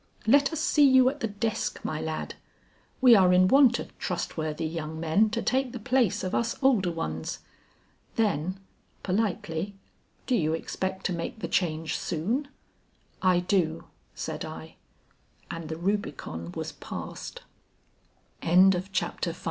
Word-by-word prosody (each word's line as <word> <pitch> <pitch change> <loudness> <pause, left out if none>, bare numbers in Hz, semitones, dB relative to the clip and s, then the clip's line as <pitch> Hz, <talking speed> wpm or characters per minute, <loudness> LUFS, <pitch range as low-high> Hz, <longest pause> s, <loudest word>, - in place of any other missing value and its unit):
Let 280 +6 +5
us 320 - -3
see 295 -2 +5
you 260 -1 +6
at 285 +2 -7
the 225 - -1
desk, 215 +1 -2
my 155 - -3
lad. 160 0 -4 0.7
We 250 -2 +8
are 185 -3 +5
in 180 0 +5
want 260 +1 +6
of - - -8
trustworthy 160 -3 -3
young 160 0 -4
men 165 +7 +3
to 230 +2 -2
take 260 -1 0
the 245 - -5
place 245 -2 +1
of 185 - -3
us 235 0 0
older 215 -10 +3
ones." 80 - -4 0.8
Then 190 -4 0 0.4
politely, 195 -2 -1 0.5
"Do 255 - +1
you 160 -7 +1
expect 190 +3 -4
to 185 - +1
make 170 +5 -4
the 220 - -4
change 160 -3 -1
soon?" 215 - -1 0.7
"I 185 -1 +4
do," 175 -4 0 0.3
said - - -4
I. - - -8 0.8
And 165 -2 -6
the 160 - -4
Rubicon 165 - -3
was - - -4
passed. - - -7 1.0
VI. - - -6
A 170 - +2
HAND 185 0 +5
CLASP. 175 -2 -2
190 Hz, 150 wpm, -27 LUFS, 165-230 Hz, 1.0 s, We